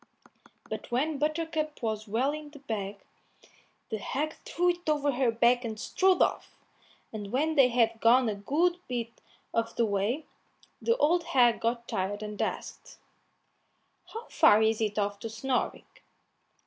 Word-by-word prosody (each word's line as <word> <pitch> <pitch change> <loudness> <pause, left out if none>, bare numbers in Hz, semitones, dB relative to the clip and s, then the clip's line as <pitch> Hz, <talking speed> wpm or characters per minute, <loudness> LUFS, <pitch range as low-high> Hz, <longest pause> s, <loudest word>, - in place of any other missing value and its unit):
But - - -6
when 275 +4 0
Buttercup 310 -1 -2
was 220 -1 -2
well 240 +7 +1
into 300 -1 -8
the 280 - -19
bag, 205 -4 -3 0.9
the 220 - -2
hag 300 +8 -2
threw 355 +1 +1
it 350 -2 -6
over 290 -1 +2
her 255 -1 +1
back 240 +2 +3
and 220 -2 -5
strode 375 +9 +3
off, - - -3 0.6
and 205 -2 -6
when 305 +5 +1
they 275 -4 +6
had 230 -2 +1
gone 245 +2 +5
a 215 - 0
good 315 - 0
bit 235 -2 -5 0.3
of 230 0 -1
the 235 - +2
way, 210 +8 -1 0.6
the 465 +1 +2
old 335 +4 +3
hag 245 -6 +3
got 235 +1 -1
tired 200 +3 -2
and 210 0 -5
asked, - - -5 1.1
"How 455 +2 -7
far 220 -10 +5
is 220 0 +1
it 210 -1 -1
off 205 -1 -1
to 225 - -5
Snoring?" 250 +3 -2
245 Hz, 155 wpm, -29 LUFS, 220-305 Hz, 1.1 s, they